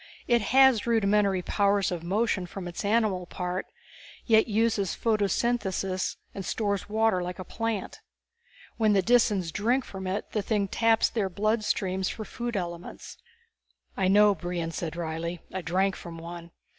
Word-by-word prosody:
It 240 -1 +3
has 260 0 +4
rudimentary 205 -4 +2
powers 200 0 +1
of 175 -2 -3
motion 190 +1 0
from 180 0 -7
its 175 +3 -5
animal 205 -4 +1
part, 180 +1 -4 0.6
yet 220 -2 +4
uses 215 -3 +1
photosynthesis 205 -3 0 0.2
and 195 - -5
stores 200 +1 -2
water 220 -3 +2
like 180 0 -5
a 185 - -6
plant. 225 -1 -3 0.8
When 215 -2 +3
the 195 -2 +3
Disans 205 -7 +2
drink 240 +6 +1
from 190 -1 -7
it 190 +3 -3
the 215 - 0
thing 200 -1 0
taps 225 +2 +3
their 205 -5 -1
blood 215 +4 0
streams 190 -2 -1
for 215 - -6
food 235 +1 -4
elements." 170 -1 -6 0.8
"I 190 - +1
know," 205 +2 +6
Brion 175 -1 -4
said 165 -1 -4
wryly. 170 +1 -4
"I 190 - -3
drank 190 +3 +1
from 170 -1 -9
one. 170 +1 -8
200 Hz, 155 wpm, -27 LUFS, 180-220 Hz, 0.8 s, know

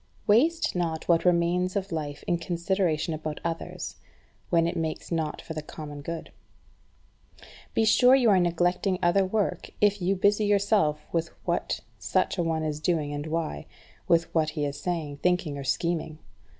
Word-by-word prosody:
4. 205 - +5
Waste 335 - +2
not 165 -3 -2
what 170 0 +3
remains 180 +1 +2
of 195 -1 -2
life 150 -3 -4
in 175 - 0
consideration 170 -2 0
about 155 -1 -4
others, 165 -1 -4 0.5
when 165 -1 +3
it 170 - -1
makes 160 0 -3
not 160 -2 -1
for 160 - -6
the 155 - -4
common 150 -1 -8
good. 165 +2 -6 1.4
Be 225 - +3
sure 250 +4 +6
you 245 -5 +4
are 190 - +5
neglecting 175 +2 +1
other 175 +3 +4
work 190 -2 -1
if 205 -1 +3
you 185 +2 +2
busy 205 +3 +3
yourself 200 -7 +2
with 165 0 0 0.2
what - - -1 0.2
such - - 0
a - - +2
one 160 -1 -1
is 150 -1 -2
doing 155 -2 0
and 145 +1 -4
why, 155 - -3 0.4
with 165 0 +2
what 160 -2 +2
he 150 - +1
is 145 0 -4
saying, 160 -5 -3
thinking, 180 -2 0
or 140 - -5
scheming. 165 +2 -1
170 Hz, 170 wpm, -27 LUFS, 155-185 Hz, 1.4 s, sure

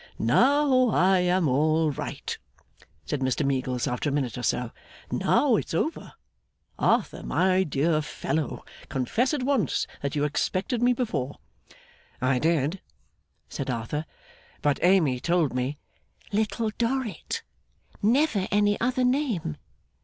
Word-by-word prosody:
'Now 255 - +4
I 190 -2 +4
am 180 -1 +2
all 155 +4 +2
right,' 135 - -5 0.7
said 150 - -2
Mr 130 +2 0
Meagles, 130 -2 -1
after 125 +4 -1
a - - -2
minute 135 -5 -1
or 125 - -5
so. 120 -1 -1 0.4
'Now 260 -7 +3
it's 175 - -3
over. 315 - -2 0.7
Arthur, - - +1
my 185 0 +2
dear 155 -1 +1
fellow, 150 0 -3 0.2
confess 140 - 0
at 295 -4 -1
once 255 - +1 0.2
that 140 0 -3
you 145 - +1
expected 185 - -1
me 245 +1 +4
before.' 215 - -2 0.8
'I 130 0 +2
did,' 160 +3 +1 0.7
said 135 - -5
Arthur; 125 +6 -3 0.6
'but 145 -2 +2
Amy 170 -9 +4
told 170 -1 +1
me 130 +3 -2 0.3
' - - -28
'Little 215 +1 0
Dorrit. 240 -1 -2 0.6
Never 230 -3 +2
any 205 0 +2
other 255 +1 +1
name. 250 - 0
170 Hz, 130 wpm, -26 LUFS, 140-230 Hz, 0.8 s, Now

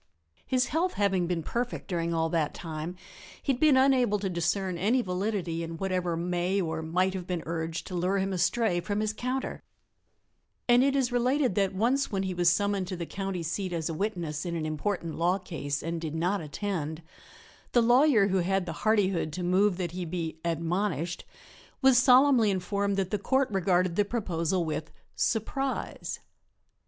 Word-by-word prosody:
His 255 -1 +2
health 345 +4 0
having 190 -3 +1
been 170 -2 -1
perfect 240 +8 -3
during 170 -3 -1
all 165 -1 +1
that 160 -3 0
time, 160 +1 -5 0.5
he 275 - +2
had 245 - -5
been 300 -3 +5
unable 260 -5 +4
to 195 -2 -3
discern 180 +2 0
any 220 +9 +2
validity 180 -3 -2
in 165 0 -5
whatever 180 -2 -1
may 180 +3 0
or 160 -3 -2
might 180 +4 +1
have 185 -2 -5
been 175 -3 -2
urged 165 0 -3
to 185 - -8
lure 180 +3 +1
him 195 0 -1
astray 195 +1 +1
from 205 +3 -2
his 215 0 0
counter 255 +4 -3 1.1
and 245 +1 +6
it 275 0 +2
is 260 -3 +1
related 250 0 +2
that 195 0 0
once 250 +7 +1
when 195 -2 -1
he 190 -1 -2
was 175 -1 +4
summoned 200 0 0
to 185 - -4
the 170 -1 -4
county 195 -1 -4
seat 180 +4 -3
as 165 -1 -2
a - - -2
witness 170 -5 -2
in 170 -1 -3
an 160 -2 -2
important 165 +2 -2
law 175 +3 +2
case 145 -7 -4
and 165 +1 -3
did 160 -1 -4
not 180 +4 0
attend, 160 -1 -4 0.7
the 240 - +5
lawyer 240 -3 +5
who 190 - +1
had 190 +1 +1
the 165 - -4
hardihood 195 -7 +2
to 180 - -4
move 185 +2 +3
that 175 -3 -2
he 180 +1 -4
be 165 -2 -4
"admonished" 170 - -1 0.6
was 265 -1 +6
solemnly 255 -3 +6
informed 200 +1 -1
that 190 -2 -1
the 210 - 0
Court 265 +4 +1
regarded 185 -2 +1
the 205 - +3
proposal 185 -5 -1
with 155 0 -3 0.3
"surprise." 265 +4 -2
185 Hz, 180 wpm, -28 LUFS, 170-210 Hz, 1.1 s, and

